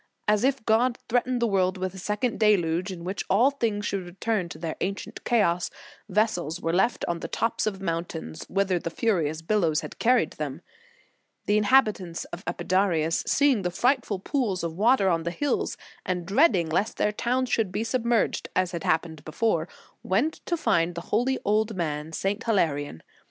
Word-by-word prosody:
As 210 +1 +3
if 265 -3 +1
God 235 +3 +3
threatened 245 0 +1
the - - +3
world 190 -2 +1
with 185 0 -3
a 190 - -9
second 210 +5 -1
deluge, 185 -4 +2
in 170 -2 -7
which 190 +3 -3
all 230 +9 +4
things 220 -7 -1
should 195 -2 -2
return 185 +1 -2
to 155 - -8
their 160 0 -4
ancient 195 +2 -4
chaos, 180 -7 +2 0.4
vessels 185 -5 0
were 165 -2 -1
left 190 +7 +1
on 170 -1 -1
the - - -5
tops 230 -1 -1
of 195 -2 -3
mountains, 165 - -4
whither 195 -2 +1
the 170 - -4
furious 165 -5 0
billows 165 -5 +1
had - - -9
carried 250 +2 +3
them. - - -5 0.8
The 205 - +2
inhabitants 210 -6 +2
of 175 +3 -6
Epidaurus, 175 -3 +1
seeing 280 -6 +3
the 180 - -1
frightful 245 +2 +1
pools 200 - -1
of 165 -1 -2
water 215 +1 +3
on 170 -3 +2
the 170 - -2
hills, 285 +11 -1 0.3
and 180 -2 -2
dreading 200 - +3
lest 185 +7 -1
their 210 - +2
town 250 +4 0
should 225 -6 0
be 210 - -1
submerged, 235 -1 0
as 185 -1 +1
had 170 -3 -5
happened 160 -1 -1
before, 165 0 0 0.3
went 235 +12 0
to 345 - 0
find 175 - +1
the 170 - -4
holy 255 +5 +2
old 215 +1 +1
man, 155 -3 -3
St. 195 +6 -2
Hilarion. 145 - 0
195 Hz, 180 wpm, -26 LUFS, 170-225 Hz, 0.8 s, all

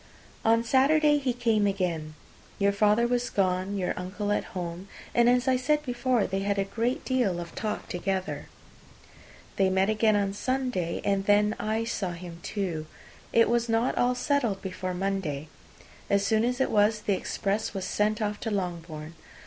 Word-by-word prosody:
On 230 +1 +4
Saturday 295 +5 +4
he 265 -3 0
came 230 -4 +2
again. 170 -6 -2 0.4
Your 200 0 +3
father 210 +3 +3
was 245 0 0
gone, 185 +1 0
your 185 -2 -1
uncle 205 +3 -3
at 205 - 0
home, 175 +2 -5 0.3
and, 240 0 +5
as 250 +1 +2
I 260 -1 +4
said 300 +4 +1
before, 245 -3 +1
they 195 0 -2
had 200 +1 -1
a 195 - +2
great 230 +6 -2
deal 245 -9 +1
of 170 -1 -7
talk 215 +1 -3
together. 190 +1 -3 1.1
They 195 -1 +4
met 190 +2 +2
again 215 0 +3
on 200 -1 +1
Sunday, 250 -7 -1
and 195 -1 +1
then 210 +1 +4
I 220 +1 -1
saw 195 -5 -2
him 170 -1 -9
too. 170 -7 -3 0.4
It 230 0 +5
was 235 0 +1
not 225 +2 +1
all 250 0 +2
settled 245 -6 0
before 185 -1 -4
Monday: 180 -6 -2 0.6
as 200 0 +2
soon 220 +1 +2
as 250 +1 -1
it 265 - +1
was, 210 +1 +3
the 205 - +1
express 205 +2 -2
was 190 -1 -3
sent 215 +2 0
off 210 0 -2
to 225 - -3
Longbourn. 170 -5 -4
205 Hz, 175 wpm, -27 LUFS, 190-235 Hz, 1.1 s, and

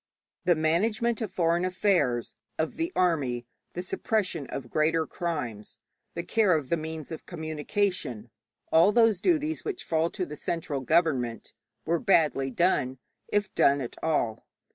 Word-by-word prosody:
The 175 - +5
management 210 +9 +1
of 215 -4 -3
foreign 170 -1 +1
affairs, 180 - +1 0.2
of 160 - -1
the 330 +2 -2
army, 140 -9 +1 0.3
the 180 - -4
suppression 185 -6 -1
of 125 -3 -6
greater 160 +1 +2
crimes, 145 -14 -4 0.4
the 170 - -3
care 205 -1 +3
of 140 -4 -6
the - - +3
means 160 -1 -6
of 160 - -7
communication, 155 - -2 0.4
all 165 +5 +6
those 225 -4 +4
duties 315 -2 +1
which 390 -4 -4
fall 160 0 +1
to 185 - -3
the 150 - -7
central 150 -3 -3
government, 130 -6 +1 0.3
were 170 +1 +1
badly 155 - +3
done, 130 -3 +1 0.3
if 205 -1 0
done 140 +1 +4
at 125 -3 -5
all. 120 -9 -1
165 Hz, 145 wpm, -28 LUFS, 140-190 Hz, 0.4 s, all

